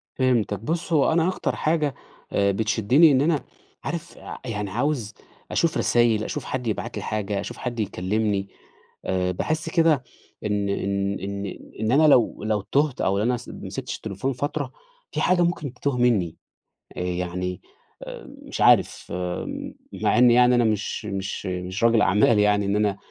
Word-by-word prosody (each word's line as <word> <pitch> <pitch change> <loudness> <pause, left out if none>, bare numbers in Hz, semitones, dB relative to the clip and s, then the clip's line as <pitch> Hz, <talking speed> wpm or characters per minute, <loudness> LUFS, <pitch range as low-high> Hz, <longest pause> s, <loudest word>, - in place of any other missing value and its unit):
فهمتك. 120 -6 +1
بُص، 165 +7 -3
هو 150 +1 +4
أنا 165 +1 +3
أكتر 185 - -1
حاجة، 150 -3 0 0.4
آآ، 100 0 +2
بتشدّني 110 - +4
إن 130 0 +4
أنا 155 -1 +1 0.4
عارف 170 0 -5
أ - - -8
يعني 105 -4 -3
عاوز 120 -1 -1 0.4
أشوف 165 -2 +1
رسايل، 115 -3 +3
أشوف 150 - -4
حد 125 -2 -3
يبعت 110 - -3
لي - - -4
حاجة، 105 -2 -2
أشوف - - -6
حد 120 -2 -4
يكلّمني. 100 0 -1 0.6
آآ، 90 -1 0
باحس 155 - -2
كده 160 -6 +3 0.4
إن 105 -1 0
إن 100 0 -1
إن 100 0 -5 0.2
إن 110 +1 0
أنا 155 +4 +5
لو 120 -6 +4
لو 110 -2 0
تُهت 140 +5 0
أو 100 +1 +1
أنا 120 +3 +1
س 125 - -12
ما - - -8
مسكتش - - -5
التليفون 110 +6 -3
فترة، 145 +4 -3 0.4
في - - -2
حاجة 180 -1 +3
ممكن 155 -6 -1
تِتُوه 135 +1 -2
منّي. 110 -9 +2 0.6
أ - - -3
يعني 90 0 -3 0.4
آآ، - - -9
مش - - -5
عارف - - +4 0.9
مع - - +2
إنّي 120 -1 +7
يعني 125 0 +5
أنا 120 - +4
مش 110 -1 -1
مش 95 0 -4
مش 90 +3 -4
راجل 115 -2 +5
أعمال 105 +2 +4
يعني 105 -1 +3
إن 100 - 0
أنا 105 -2 +1
110 Hz, 165 wpm, -24 LUFS, 100-135 Hz, 0.9 s, إنّي